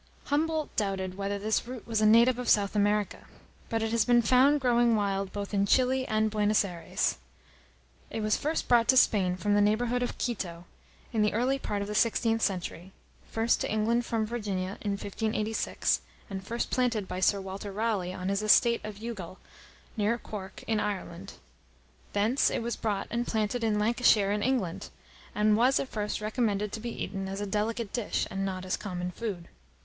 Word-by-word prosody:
Humboldt 310 Hz, +1 st, -1 dB
doubted 190 Hz, -3 st, -1 dB
whether 200 Hz, +1 st, -2 dB
this 215 Hz, +3 st, -1 dB
root 250 Hz, -3 st, -7 dB
was 225 Hz, -2 st, 0 dB
a 215 Hz, -, +5 dB
native 235 Hz, +3 st, +5 dB
of 250 Hz, -, -2 dB
South 205 Hz, 0 st, +3 dB
America; 205 Hz, 0 st, 0 dB, 0.4 s
but 225 Hz, -1 st, 0 dB
it 225 Hz, -, -1 dB
has 230 Hz, -1 st, +3 dB
been 240 Hz, -1 st, +4 dB
found 260 Hz, +6 st, +5 dB
growing 240 Hz, -3 st, +3 dB
wild 195 Hz, -2 st, -1 dB
both 205 Hz, 0 st, -5 dB
in 200 Hz, 0 st, +2 dB
Chili 260 Hz, +3 st, +2 dB
and 215 Hz, 0 st, +1 dB
Buenos 210 Hz, 0 st, +2 dB
Ayres. 170 Hz, -, -2 dB, 0.9 s
It 225 Hz, -, -4 dB
was 215 Hz, 0 st, +2 dB
first 310 Hz, +2 st, -2 dB
brought 235 Hz, -2 st, +4 dB
to 260 Hz, -, +5 dB
Spain 190 Hz, -7 st, +4 dB
from 205 Hz, +2 st, 0 dB
the 205 Hz, -, +4 dB
neighbourhood 230 Hz, +4 st, +1 dB
of 245 Hz, -, -3 dB
Quito, 180 Hz, -8 st, -4 dB, 0.5 s
in 220 Hz, -, +1 dB
the 210 Hz, -, +2 dB
early 260 Hz, +4 st, +1 dB
part 205 Hz, -5 st, -2 dB
of -, -, -6 dB
the 210 Hz, -, -4 dB
sixteenth 225 Hz, +1 st, +2 dB
century, 185 Hz, -1 st, -2 dB, 0.4 s
first 225 Hz, +1 st, +1 dB
to -, -, -2 dB
England 225 Hz, +3 st, +1 dB
from 225 Hz, -2 st, -1 dB
Virginia, 200 Hz, -5 st, -3 dB
in 205 Hz, -1 st, -1 dB
1586, 215 Hz, +2 st, -1 dB, 0.3 s
and 190 Hz, -1 st, -5 dB
first 235 Hz, +5 st, -3 dB
planted 235 Hz, -6 st, 0 dB
by 180 Hz, -, -4 dB
Sir 200 Hz, +2 st, +3 dB
Walter 195 Hz, +1 st, -6 dB
Raleigh, 205 Hz, -3 st, -1 dB
on 185 Hz, 0 st, -4 dB
his 200 Hz, +1 st, 0 dB
estate 225 Hz, +3 st, +4 dB
of 210 Hz, -1 st, -7 dB
Youghal, 200 Hz, -5 st, -7 dB, 0.6 s
near 220 Hz, +1 st, +1 dB
Cork, 205 Hz, -3 st, -8 dB
in 220 Hz, -1 st, 0 dB
Ireland. 195 Hz, -2 st, -4 dB, 0.8 s
Thence 215 Hz, +7 st, +2 dB
it -, -, -2 dB
was 235 Hz, 0 st, -2 dB
brought 205 Hz, -3 st, -2 dB
and 240 Hz, +1 st, -1 dB
planted 220 Hz, +2 st, -1 dB
in 215 Hz, -2 st, +1 dB
Lancashire, 215 Hz, -2 st, +3 dB
in 205 Hz, 0 st, 0 dB
England, 225 Hz, -8 st, -1 dB, 0.5 s
and 210 Hz, 0 st, +3 dB
was, 250 Hz, +5 st, +4 dB
at 265 Hz, -, -3 dB
first, 210 Hz, -1 st, -3 dB
recommended 210 Hz, -2 st, -1 dB
to 220 Hz, -, -5 dB
be 235 Hz, +1 st, -4 dB
eaten 195 Hz, -1 st, -4 dB
as 195 Hz, +1 st, -4 dB
a 205 Hz, -, -2 dB
delicate 210 Hz, +2 st, -2 dB
dish, 235 Hz, -4 st, -1 dB
and 195 Hz, 0 st, -2 dB
not 185 Hz, -1 st, -3 dB
as 185 Hz, -, 0 dB
common 180 Hz, -3 st, -4 dB
food. 190 Hz, -4 st, -5 dB
215 Hz, 185 wpm, -29 LUFS, 200-235 Hz, 0.9 s, a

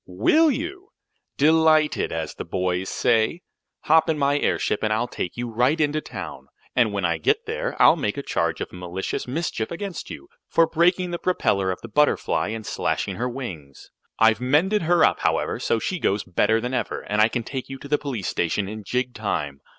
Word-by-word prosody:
"Will 135 Hz, -, +3 dB
you? 350 Hz, +7 st, -4 dB, 0.5 s
Delighted, 155 Hz, 0 st, +3 dB
as 80 Hz, -1 st, -3 dB
the -, -, -6 dB
boys 90 Hz, +1 st, -2 dB
say. 120 Hz, +7 st, +1 dB, 0.4 s
Hop 160 Hz, +1 st, +4 dB
in 160 Hz, -, +1 dB
my 140 Hz, 0 st, +2 dB
airship 105 Hz, -, 0 dB
and 110 Hz, -, 0 dB
I'll 110 Hz, +3 st, +1 dB
take 90 Hz, -, -5 dB
you 120 Hz, 0 st, -3 dB
right 125 Hz, +7 st, +1 dB
into 155 Hz, 0 st, +1 dB
town. -, -, -8 dB, 0.3 s
And 120 Hz, -4 st, +3 dB
when 100 Hz, -2 st, -1 dB
I 85 Hz, -1 st, 0 dB
get -, -, +3 dB
you -, -, -5 dB
there -, -, -3 dB
I'll -, -, +7 dB
make 105 Hz, -, -2 dB
a 140 Hz, -, -3 dB
charge 85 Hz, -8 st, -1 dB
of -, -, -5 dB
malicious 90 Hz, +4 st, -4 dB
mischief 125 Hz, -5 st, -2 dB
against 190 Hz, +1 st, -6 dB
you, 345 Hz, -, -9 dB, 0.2 s
for 165 Hz, -, +4 dB
breaking 175 Hz, +2 st, +2 dB
the 175 Hz, -, -3 dB
propeller 100 Hz, -, +1 dB
of 90 Hz, -, -3 dB
the -, -, -6 dB
Butterfly 150 Hz, +7 st, +1 dB
and 110 Hz, 0 st, -5 dB
slashing -, -, -2 dB
her 125 Hz, +2 st, -1 dB
wings. 90 Hz, -, -8 dB, 0.3 s
I've 115 Hz, +1 st, +4 dB
mended 160 Hz, +11 st, +2 dB
her 170 Hz, +1 st, +4 dB
up, -, -, +1 dB
however, -, -, 0 dB
so -, -, +1 dB
she 185 Hz, +10 st, -3 dB
goes 100 Hz, -6 st, 0 dB
better 105 Hz, +5 st, +1 dB
than 125 Hz, +3 st, -4 dB
ever, -, -, -2 dB
and 105 Hz, +1 st, 0 dB
I 110 Hz, -, +6 dB
can 120 Hz, 0 st, -3 dB
take 130 Hz, +2 st, -6 dB
you 135 Hz, -, -6 dB
to 140 Hz, -, -10 dB
the 150 Hz, +1 st, +1 dB
police 125 Hz, -10 st, -4 dB
station 90 Hz, +4 st, -1 dB
in 110 Hz, +1 st, -7 dB
jig 125 Hz, +4 st, -2 dB
time. 75 Hz, -10 st, -3 dB
125 Hz, 205 wpm, -23 LUFS, 100-155 Hz, 0.5 s, I'll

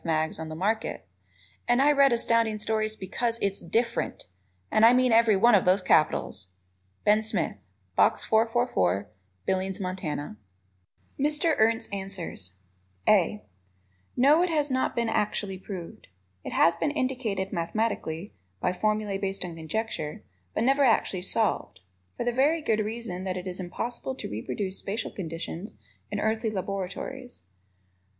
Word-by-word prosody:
mags 160 Hz, -1 st, 0 dB
on 160 Hz, -1 st, -5 dB
the 155 Hz, -, -6 dB
market, 210 Hz, +6 st, -1 dB, 0.6 s
and 240 Hz, +1 st, +4 dB
I 285 Hz, +2 st, +5 dB
read 280 Hz, -2 st, +5 dB
Astounding 230 Hz, -2 st, +2 dB
Stories 215 Hz, 0 st, -1 dB
because 230 Hz, +4 st, -2 dB
it -, -, 0 dB
is 195 Hz, -, -6 dB
DIFFERENT, 235 Hz, +1 st, -1 dB, 0.5 s
and 215 Hz, -, +3 dB
I 230 Hz, +2 st, +9 dB
mean 255 Hz, 0 st, +4 dB
every 225 Hz, -2 st, +5 dB
one 235 Hz, +5 st, +5 dB
of 200 Hz, -, +6 dB
those 185 Hz, +1 st, +3 dB
capitals! 105 Hz, -, +2 dB, 0.6 s
Ben 210 Hz, +1 st, +5 dB
Smith, 220 Hz, 0 st, -1 dB, 0.4 s
Box -, -, +3 dB
444, 220 Hz, -, +1 dB, 0.3 s
Billings, 190 Hz, 0 st, -1 dB
Mont. 185 Hz, -1 st, -4 dB, 1.2 s
Mr. 300 Hz, +3 st, +2 dB
Ernst's 225 Hz, +1 st, +2 dB
Answers: 190 Hz, -, -4 dB, 0.5 s
(a) 210 Hz, +1 st, +3 dB, 0.7 s
No, 285 Hz, +6 st, +6 dB
it 360 Hz, -, +2 dB
has 300 Hz, -3 st, 0 dB
not 260 Hz, 0 st, 0 dB
been 235 Hz, -1 st, +1 dB
actually 205 Hz, -3 st, -1 dB
proved. 185 Hz, -3 st, -8 dB, 0.4 s
It -, -, -6 dB
has 170 Hz, -, +5 dB
been 230 Hz, -, 0 dB
indicated 245 Hz, -9 st, -2 dB
mathematically 180 Hz, -1 st, -2 dB, 0.3 s
(by 180 Hz, -, 0 dB
formulae 210 Hz, 0 st, 0 dB
based 195 Hz, -1 st, -2 dB
on 170 Hz, -2 st, -7 dB
conjecture), 160 Hz, -1 st, -4 dB, 0.3 s
but -, -, +1 dB
never 275 Hz, +3 st, +4 dB
actually 220 Hz, -6 st, +2 dB
solved 200 Hz, -, 0 dB, 0.4 s
for -, -, -1 dB
the 240 Hz, -, +1 dB
very 295 Hz, +6 st, +2 dB
good 220 Hz, -5 st, +1 dB
reason 215 Hz, -4 st, -3 dB
that 185 Hz, -1 st, -2 dB
it 180 Hz, -, -6 dB
is 185 Hz, 0 st, -5 dB
impossible 235 Hz, +8 st, -4 dB
to -, -, -5 dB
reproduce 185 Hz, -, -3 dB
spacial 215 Hz, +3 st, -3 dB
conditions 165 Hz, -, -6 dB, 0.3 s
in -, -, -3 dB
earthly 220 Hz, +1 st, 0 dB
laboratories. 200 Hz, -, -5 dB
215 Hz, 145 wpm, -27 LUFS, 185-235 Hz, 1.2 s, I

